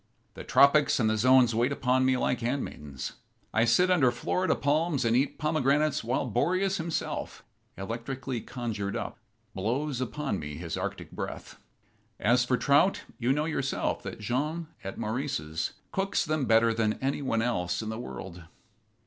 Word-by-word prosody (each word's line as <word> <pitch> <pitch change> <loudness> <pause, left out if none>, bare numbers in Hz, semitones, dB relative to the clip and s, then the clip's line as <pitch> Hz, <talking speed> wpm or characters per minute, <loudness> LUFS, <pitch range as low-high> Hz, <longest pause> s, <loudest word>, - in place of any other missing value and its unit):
The - - -8
tropics 140 +1 +5
and 110 - +3
the 110 - +2
zones 125 +1 +5
wait 120 +4 +2
upon 130 -1 +2
me 130 0 +3
like 125 - 0
handmaidens. 115 - -4 0.4
I 110 +1 +4
sit 180 +11 +4
under 150 -9 +5
Florida 180 +9 0
palms 150 -1 +1
and 115 0 +3
eat 135 +3 +1
pomegranates 150 -1 +1
while 120 +4 0
Boreas 185 - +1
himself, 165 -1 -3 0.3
electrically 120 +5 -4
conjured 110 -6 -4
up, - - -5 0.3
blows 125 +7 -1
upon 135 -4 -2
me 75 -1 -6
his 80 +1 -5
Arctic - - -5
breath. - - -7 0.6
As 125 +3 +3
for 125 0 +1
trout, 145 +9 +3 0.2
you 125 +1 +1
know, 150 +2 +1
yourself, 140 -4 -1
that - - -7
Jean, 150 +9 -2
at 95 - -6
Maurice's, 105 - -2 0.2
cooks 195 0 0
them 155 -3 0
better 115 0 +4
than 110 -1 +1
any 135 +4 -2
one 115 -5 0
else 90 -5 -1
in 110 - -4
the 110 +1 -4
world." 90 -7 -8
125 Hz, 155 wpm, -28 LUFS, 110-145 Hz, 0.6 s, tropics